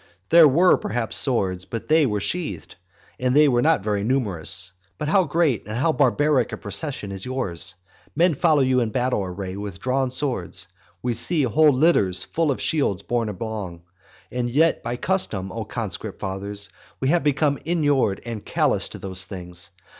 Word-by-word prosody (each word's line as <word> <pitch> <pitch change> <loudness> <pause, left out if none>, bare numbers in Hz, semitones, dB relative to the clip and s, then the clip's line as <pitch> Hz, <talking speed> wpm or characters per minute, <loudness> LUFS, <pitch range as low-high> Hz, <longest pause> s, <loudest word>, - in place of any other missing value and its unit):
There 165 -1 +8
were 170 +7 +5
perhaps 115 +1 -2
swords, 95 -9 +2
but 115 - -6
they 155 -2 +4
were 105 -3 -1
sheathed, 170 - -4 0.5
and 125 +1 +1
they 150 0 +6
were 120 -3 +2
not 155 -8 +2
very 105 -1 -1
numerous. 95 - +1 0.2
But 150 - -3
how 190 +2 +4
great 150 -8 0
and 110 +2 -4
how 160 +6 +2
barbaric 145 -2 +2
a - - -5
procession 105 -1 -2
is 95 -1 -6
yours! 95 -9 -2 0.4
Men 170 +2 +3
follow 150 -1 +3
you 130 -1 +2
in 115 -3 0
battle 125 -3 0
array 95 0 -5
with 100 -2 -6
drawn 130 0 0
swords; 125 - -3 0.4
we 125 -1 0
see 155 +5 +2
whole 150 +5 +4
litters 125 - +3
full 165 -2 -1
of 135 - -1
shields 140 - 0
borne 120 -2 -1
along. 100 -4 -6 0.5
And 125 -1 -2
yet 160 +7 +2
by 120 +1 -3
custom, 110 - -1
O - - -5
conscript - - -5
fathers, 100 +1 -4 0.3
we 135 - 0
have 170 +2 +2
become 145 0 +1
inured 145 - +1
and 115 -3 -5
callous - - +1
to - - -9
these 95 -1 -5
things. 90 -2 -8
125 Hz, 175 wpm, -23 LUFS, 100-150 Hz, 0.5 s, There